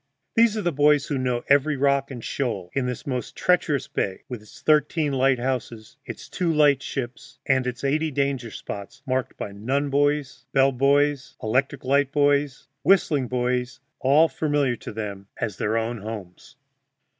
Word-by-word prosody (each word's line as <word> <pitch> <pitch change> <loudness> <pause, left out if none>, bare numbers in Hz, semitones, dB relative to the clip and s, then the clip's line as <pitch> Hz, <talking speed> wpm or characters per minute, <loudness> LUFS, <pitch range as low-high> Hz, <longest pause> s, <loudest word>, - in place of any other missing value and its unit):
These 225 -1 +4
are 210 - -2
the 175 - +1
boys 145 0 +3
who 145 -4 -2
know 125 -2 -1
every 145 +1 +3
rock 140 0 +2
and 125 -4 -8
shoal 100 -10 -3
in 135 -2 0
this 125 -2 -5
most 125 -3 -4
treacherous 165 -6 +1
bay, 95 -1 -3
with 125 -4 -6
its 105 - -15
thirteen 150 0 +2
lighthouses, 130 -4 -1
its - - -8
two 175 -2 -1
light 145 -3 +4
ships, 125 -3 -6
and 130 -1 +2
its 125 +1 -5
eighty 155 +3 +1
danger 140 -4 -1
spots, 100 +5 -8
marked 130 0 -2
by 100 - -5
nun 135 +8 -1
buoys, 145 -2 0
bell 135 0 +4
buoys, 140 +1 +1
electric 130 +5 0
light 140 +1 +2
buoys, 145 -3 +1
whistling 155 -9 +3
buoys, 125 0 -1 0.2
all 145 +5 +5
familiar 145 -6 0
to - - -8
them 100 -3 -6
as 100 -4 -3
their 110 +2 0
own 115 +1 -2
homes. 100 -4 -8
135 Hz, 165 wpm, -24 LUFS, 120-145 Hz, 0.2 s, all